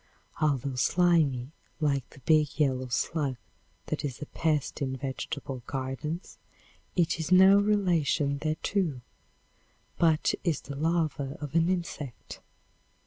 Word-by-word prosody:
Although 140 Hz, -3 st, +1 dB
slimy, 155 Hz, -6 st, +2 dB, 0.3 s
like 140 Hz, -4 st, 0 dB
the 140 Hz, -, -16 dB
big 155 Hz, +1 st, +2 dB
yellow 130 Hz, -3 st, +1 dB
slug 140 Hz, +2 st, -1 dB, 0.5 s
that -, -, -3 dB
is 135 Hz, -4 st, -4 dB
a 150 Hz, -, -5 dB
pest 150 Hz, -2 st, -1 dB
in 130 Hz, -1 st, -1 dB
vegetable 130 Hz, -1 st, -5 dB
gardens, 135 Hz, +6 st, -4 dB, 0.6 s
it 170 Hz, -2 st, +2 dB
is 160 Hz, +2 st, -3 dB
no 190 Hz, +2 st, +8 dB
relation 170 Hz, -9 st, +2 dB
thereto, 155 Hz, -1 st, -1 dB, 1.0 s
but 160 Hz, -2 st, +3 dB
is 170 Hz, -6 st, 0 dB
the 140 Hz, -, -8 dB
larva 155 Hz, -2 st, -1 dB
of 145 Hz, -3 st, -6 dB
an 165 Hz, +1 st, +3 dB
insect. 170 Hz, -8 st, -4 dB
150 Hz, 120 wpm, -28 LUFS, 135-170 Hz, 1.0 s, no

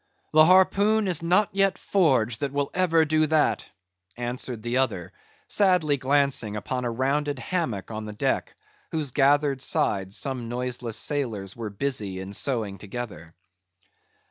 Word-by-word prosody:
"The 155 Hz, 0 st, +7 dB
harpoon 200 Hz, +4 st, +4 dB
is 175 Hz, -4 st, +1 dB
not 185 Hz, +5 st, +3 dB
yet 195 Hz, -1 st, +2 dB
forged 130 Hz, -, +1 dB
that 140 Hz, -1 st, -3 dB, 0.2 s
ever 180 Hz, -3 st, +1 dB
will 160 Hz, -, +6 dB
do 155 Hz, 0 st, +2 dB
that," 155 Hz, 0 st, +1 dB, 0.5 s
answered 120 Hz, -1 st, -4 dB
the 120 Hz, +1 st, -1 dB
other, 95 Hz, -8 st, -1 dB, 0.3 s
sadly 180 Hz, -8 st, +3 dB
glancing 135 Hz, -5 st, +1 dB
upon 125 Hz, +4 st, -3 dB
a -, -, 0 dB
rounded 140 Hz, +4 st, -1 dB
hammock 130 Hz, -, -3 dB
on 110 Hz, 0 st, -5 dB
the 105 Hz, -, -7 dB
deck, 105 Hz, -, -1 dB, 0.4 s
whose 155 Hz, -4 st, -2 dB
gathered 140 Hz, 0 st, +2 dB
sides 95 Hz, -6 st, 0 dB
some 125 Hz, -4 st, -3 dB
noiseless 125 Hz, -2 st, -3 dB
sailors 110 Hz, -10 st, -2 dB
were 115 Hz, -2 st, -5 dB
busy 100 Hz, -4 st, -3 dB
in 95 Hz, +1 st, -7 dB
sewing 105 Hz, -5 st, 0 dB
together. 100 Hz, -6 st, -8 dB
130 Hz, 145 wpm, -25 LUFS, 110-155 Hz, 0.5 s, The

